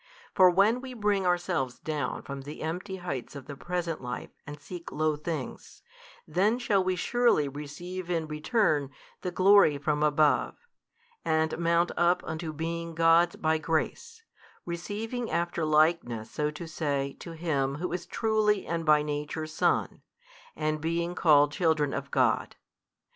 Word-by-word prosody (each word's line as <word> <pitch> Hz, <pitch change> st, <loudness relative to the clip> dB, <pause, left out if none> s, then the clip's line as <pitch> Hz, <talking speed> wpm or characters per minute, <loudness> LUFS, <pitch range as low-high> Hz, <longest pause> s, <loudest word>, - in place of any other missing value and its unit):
For 185 Hz, -2 st, +7 dB
when 200 Hz, +7 st, +3 dB
we 260 Hz, -1 st, -8 dB
bring 205 Hz, -4 st, +1 dB
ourselves 175 Hz, -8 st, 0 dB
down 155 Hz, -2 st, -3 dB
from 140 Hz, -1 st, -6 dB
the 145 Hz, +3 st, -8 dB
empty 180 Hz, +5 st, -4 dB
heights 160 Hz, -9 st, -5 dB
of 140 Hz, -2 st, -8 dB
the 145 Hz, -, -8 dB
present 175 Hz, +1 st, -3 dB
life 125 Hz, -1 st, -6 dB, 0.2 s
and 145 Hz, 0 st, -8 dB
seek 175 Hz, +3 st, -9 dB
low 155 Hz, 0 st, +1 dB
things, 150 Hz, -2 st, -6 dB, 0.4 s
then 195 Hz, +8 st, +2 dB
shall 210 Hz, -6 st, +1 dB
we 185 Hz, 0 st, 0 dB
surely 235 Hz, -, +2 dB
receive 160 Hz, +6 st, -7 dB
in 165 Hz, -2 st, 0 dB
return 150 Hz, -, +1 dB, 0.3 s
the 180 Hz, -, -2 dB
glory 185 Hz, -4 st, +5 dB
from 150 Hz, +1 st, -1 dB
above, 150 Hz, 0 st, +3 dB, 0.7 s
and 160 Hz, 0 st, +1 dB
mount 170 Hz, +1 st, +2 dB
up 175 Hz, +1 st, +3 dB
unto 160 Hz, 0 st, -4 dB
being 165 Hz, +2 st, -4 dB
gods 165 Hz, +1 st, +4 dB
by 160 Hz, 0 st, +1 dB
grace, 450 Hz, -, -2 dB, 0.4 s
receiving 215 Hz, +8 st, -4 dB
after 170 Hz, -1 st, -1 dB
likeness 155 Hz, -8 st, +2 dB
so 150 Hz, 0 st, -1 dB
to 150 Hz, +3 st, -7 dB
say 140 Hz, -4 st, -2 dB
to 170 Hz, -, -8 dB
Him 145 Hz, -5 st, -1 dB
Who 175 Hz, +4 st, -4 dB
is 180 Hz, -1 st, -4 dB
truly 215 Hz, -2 st, +1 dB
and 165 Hz, 0 st, -2 dB
by 150 Hz, -1 st, +4 dB
Nature 150 Hz, +1 st, -3 dB
Son, 155 Hz, 0 st, 0 dB, 0.6 s
the 155 Hz, 0 st, 0 dB
being 170 Hz, +2 st, -1 dB
called 145 Hz, -4 st, +5 dB
children 155 Hz, -3 st, +1 dB
of 140 Hz, 0 st, -4 dB
God. 125 Hz, -5 st, +1 dB
165 Hz, 150 wpm, -28 LUFS, 150-180 Hz, 0.7 s, For